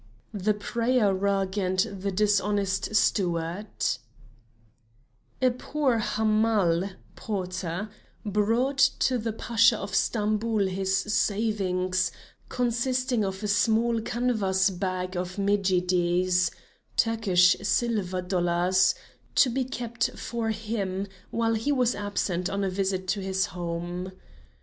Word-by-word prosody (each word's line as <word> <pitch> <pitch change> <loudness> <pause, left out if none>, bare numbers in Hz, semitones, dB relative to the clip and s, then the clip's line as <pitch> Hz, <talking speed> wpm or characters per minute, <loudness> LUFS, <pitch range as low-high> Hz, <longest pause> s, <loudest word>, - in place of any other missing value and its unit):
THE 205 +1 0
PRAYER 230 0 +1
RUG 195 0 0
AND 185 -1 -1 0.2
THE 200 +1 -2
DISHONEST 205 0 +1
STEWARD 175 -1 +1 1.8
A 255 - +5
poor 255 -1 0
Hamal 215 -5 +1 0.3
(porter) 185 -1 -4 0.4
brought 225 +7 +1 0.2
to 255 -2 +1
the 225 0 -2
Pasha 230 +1 +3
of 200 -1 -6
Stamboul 215 0 +1
his 190 0 0
savings, 195 -3 0 0.4
consisting 250 0 0
of 190 +1 -4
a - - -1
small 225 +3 +2
canvas 205 -6 +1
bag 185 0 -3
of 180 0 -3
medjidies 180 -2 +2 0.5
(Turkish 195 -6 +4
silver 200 -6 0
dollars), 180 0 +2 0.4
to 255 - +5
be 260 +2 0
kept 235 -2 -3
for 230 -2 -3
him, 210 -3 -2 0.2
while 230 0 0
he 225 +6 0
was 250 -3 +2
absent 195 -3 -2
on 200 0 -2
a 190 - 0
visit 190 -1 -1
to 200 +3 0
his 190 0 0
home. 175 +1 -4
200 Hz, 110 wpm, -27 LUFS, 185-225 Hz, 1.8 s, A